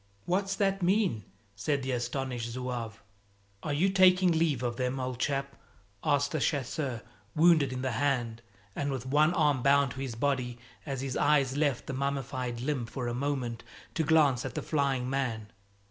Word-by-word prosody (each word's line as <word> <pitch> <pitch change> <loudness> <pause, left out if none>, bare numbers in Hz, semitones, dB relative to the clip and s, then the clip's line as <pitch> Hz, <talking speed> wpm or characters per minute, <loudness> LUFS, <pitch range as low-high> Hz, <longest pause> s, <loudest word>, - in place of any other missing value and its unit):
"What's 195 +2 0
that 195 -1 +1
mean?" 180 - +1 0.3
said 140 +7 -1
the 130 - -2
astonished 125 -1 -2
zouave. 120 -3 -5 0.6
"Are 150 - -3
you 150 +7 +2
taking 185 -1 +5
leave 160 -6 +1
of 120 0 -2
'em, 130 +1 -1
old 130 -1 -3
chap?" 140 0 -1 0.5
asked 145 +1 +1
a 155 - 0
chasseur 135 -4 -1 0.3
wounded 160 -4 +5
in 130 0 -4
the 130 - 0
hand 120 -3 -1 0.3
and 145 0 -1
with 130 -2 -4
one 150 +4 +3
arm 145 -5 +2
bound 140 0 +4
to 130 - -8
his 130 -4 -4
body, 125 -1 -1 0.3
as 135 -2 -3
his 135 -2 -3
eyes 140 -3 +3
left 145 -4 0
the - - -5
mummified 130 -3 -2
limb 130 -3 -2
for 125 0 -4
a 120 - -2
moment 125 -3 -2 0.3
to 160 - 0
glance 145 -6 +4
at 130 - -6
the - - -3
flying 135 -4 0
man. 115 -5 -2
135 Hz, 175 wpm, -30 LUFS, 125-150 Hz, 0.6 s, taking